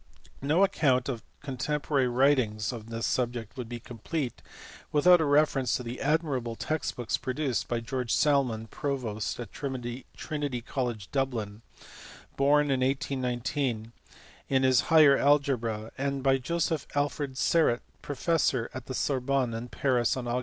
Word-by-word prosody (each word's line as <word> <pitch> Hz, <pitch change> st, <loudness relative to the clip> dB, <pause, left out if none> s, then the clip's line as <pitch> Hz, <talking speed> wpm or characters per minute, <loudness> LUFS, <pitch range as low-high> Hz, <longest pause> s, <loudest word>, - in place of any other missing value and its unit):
No 155 Hz, +7 st, +3 dB
account 135 Hz, -10 st, +2 dB
of 120 Hz, -4 st, -3 dB, 0.2 s
contemporary 140 Hz, 0 st, 0 dB
writings 120 Hz, -4 st, +2 dB
on 115 Hz, -2 st, -8 dB
this 115 Hz, 0 st, -3 dB
subject 120 Hz, -2 st, -2 dB
would 125 Hz, -4 st, -6 dB
be 120 Hz, -1 st, -5 dB
complete 125 Hz, +4 st, -4 dB, 0.5 s
without 175 Hz, +4 st, +6 dB
a -, -, +2 dB
reference 145 Hz, -3 st, +3 dB
to 125 Hz, -, -7 dB
the 120 Hz, +1 st, -6 dB
admirable 140 Hz, -6 st, 0 dB
text 155 Hz, +5 st, -2 dB
books 120 Hz, -3 st, -1 dB
produced 130 Hz, -1 st, -2 dB
by 120 Hz, -1 st, -1 dB
George 125 Hz, 0 st, -3 dB
Salmon, 130 Hz, -7 st, +2 dB
provost 115 Hz, -4 st, -3 dB
of 120 Hz, -4 st, -7 dB
Trinity 130 Hz, +1 st, -4 dB
College, 120 Hz, -7 st, -3 dB
Dublin, 115 Hz, -6 st, -2 dB, 0.7 s
born 145 Hz, +1 st, +3 dB
in 135 Hz, -, +2 dB
1819, 130 Hz, -3 st, -1 dB, 0.6 s
in 135 Hz, -1 st, +2 dB
his 130 Hz, -1 st, +5 dB
Higher 155 Hz, -4 st, +7 dB
Algebra, 125 Hz, -7 st, +1 dB
and 140 Hz, -1 st, -1 dB
by 135 Hz, -1 st, +3 dB
Joseph 160 Hz, +2 st, -1 dB
Alfred 145 Hz, -2 st, -1 dB
Serret, 150 Hz, -6 st, +3 dB, 0.2 s
professor 145 Hz, -4 st, 0 dB
at 130 Hz, -, -7 dB
the 130 Hz, -, -4 dB
Sorbonne, 135 Hz, -2 st, 0 dB
born 115 Hz, +1 st, -4 dB
at -, -, -13 dB
Paris 125 Hz, -2 st, +1 dB
on 125 Hz, -, -4 dB
Aug. 120 Hz, +1 st, 0 dB
130 Hz, 145 wpm, -28 LUFS, 120-145 Hz, 0.7 s, Higher